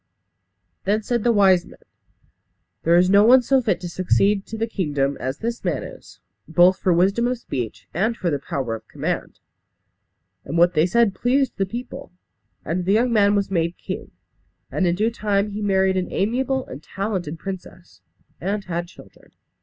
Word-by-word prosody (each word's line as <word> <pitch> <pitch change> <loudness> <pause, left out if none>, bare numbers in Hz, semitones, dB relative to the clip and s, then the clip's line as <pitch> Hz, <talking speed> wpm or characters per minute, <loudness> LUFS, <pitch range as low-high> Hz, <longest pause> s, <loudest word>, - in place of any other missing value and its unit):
Then 210 +3 0
said 235 0 -1
the 240 - +3
wise 190 -5 +4
men, - - -15 1.0
"There 170 +1 +3
is 180 +1 +5
no 200 +2 +6
one 250 +3 +6
so 265 +2 +3
fit 200 -7 0
to 180 - -5
succeed 195 +3 +1
to 225 - -6
the 225 - 0
kingdom 145 -10 -1
as 130 +2 -3
this 235 +1 -4
man 170 -8 -1
is; - - -12 0.3
both 180 +3 +4
for 185 - +1
wisdom 195 +7 +2
of 250 0 -1
speech 110 - -5
and 220 +7 0
for 175 - -1
the 145 - -1
power 135 -4 -3
of 115 - -8
command." - - -4 1.1
And 155 +5 -4
what 175 +1 +5
they 155 +1 +3
said 230 +1 +3
pleased 265 +4 +1
the 195 - 0
people; 250 +4 -7 0.5
and 175 +3 -2
the 195 - +2
young 235 +2 +2
man 205 -2 +4
was 200 -1 -1
made 170 -1 0
king. - - -6 0.6
And 185 - +1
in 170 - +2
due 215 +5 +1
time 210 -2 0
he 210 +1 -5
married 190 -2 +2
an 180 -1 -2
amiable 260 +5 0
and 130 - -9
talented 185 -2 -4
princess, 185 -1 -9 0.4
and 200 +3 -2
had 175 -1 -3
children. - - -18
195 Hz, 180 wpm, -22 LUFS, 175-220 Hz, 1.1 s, no